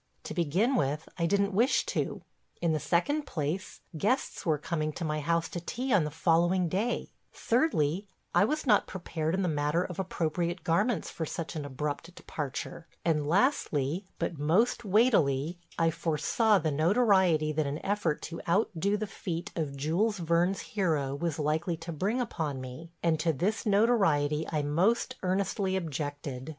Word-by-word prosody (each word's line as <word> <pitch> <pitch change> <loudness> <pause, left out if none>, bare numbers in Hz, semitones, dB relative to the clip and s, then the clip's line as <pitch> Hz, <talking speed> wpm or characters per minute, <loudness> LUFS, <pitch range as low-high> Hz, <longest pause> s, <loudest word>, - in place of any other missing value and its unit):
To - - -6
begin 180 - +1
with, 150 - 0
I 170 - +2
didn't 200 +2 +1
wish 235 +8 +3
to. - - -2 0.4
In 170 -2 +1
the 155 - 0
second 285 - 0
place, 155 +3 -3
guests 210 - -1
were 155 -2 +3
coming 155 0 -2
to 170 - -4
my 155 0 -1
house 165 +2 0
to 175 - -4
tea 245 +9 -2
on 175 -6 +4
the - - -2
following 170 +3 +2
day; 200 +8 -1 0.2
thirdly, 200 - +1 0.3
I - - +5
was 305 +7 -1
not 215 -5 +4
prepared 165 -3 -2
in 195 - 0
the - - +1
matter 150 +2 +1
of 180 - -7
appropriate 175 -1 -2
garments 200 +4 +1
for 160 - -4
such 165 +1 -5
an 150 -2 -3
abrupt 150 +5 -4
departure, 150 +2 -5 0.2
and 150 -3 +1
lastly, 175 - +1
but 165 - -3
most 185 +12 +2
weightily, 175 - +2 0.2
I 165 -1 +3
foresaw 165 +8 +2
the 160 -4 0
notoriety 175 - +3
that 155 -1 0
an 140 +1 -2
effort 195 -6 0
to 170 - -6
outdo 200 +1 +1
the 215 - -2
feat 175 -4 -5
of 145 -4 -3
Jules 180 +10 +1
Verne's 170 +2 +1
hero 155 -9 -1
was 160 +1 -2
likely 160 +3 0
to 165 +1 -7
bring 200 - -1
upon 160 - -2
me, 130 +6 -8
and 165 -2 +2
to 165 +1 +2
this 195 +10 -1
notoriety 195 -9 +3
I 150 -2 0
most 195 - +1
earnestly 190 +1 0
objected. 145 -5 -4
170 Hz, 165 wpm, -29 LUFS, 155-200 Hz, 0.4 s, I